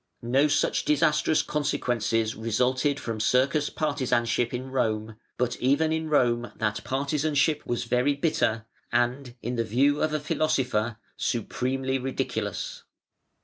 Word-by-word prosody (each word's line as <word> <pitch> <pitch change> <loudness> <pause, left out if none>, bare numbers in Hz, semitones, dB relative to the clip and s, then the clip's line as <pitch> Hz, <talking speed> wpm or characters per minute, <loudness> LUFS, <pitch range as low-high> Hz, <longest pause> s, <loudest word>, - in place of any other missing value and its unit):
No 135 +5 +3
such 145 - +1
disastrous 150 +1 +2
consequences 120 -6 0
resulted 130 +6 0
from 115 -2 -4
circus 135 +6 +2
partisanship 125 -6 0
in 130 +1 -5
Rome: 110 -4 -1 0.2
but 125 -1 0
even 145 +5 +2
in 160 0 -2
Rome 120 -5 +2
that 105 -1 -2
partisanship 145 +2 +1
was 120 0 -1
very 125 +4 +1
bitter, 115 -7 0 0.3
and, 120 +1 0
in 120 +1 -3
the 115 - +2
view 135 +7 +2
of 155 - +1
a 155 - 0
philosopher, 130 -7 0 0.2
supremely 130 +3 -1
ridiculous. - - -3
130 Hz, 125 wpm, -26 LUFS, 120-145 Hz, 0.3 s, No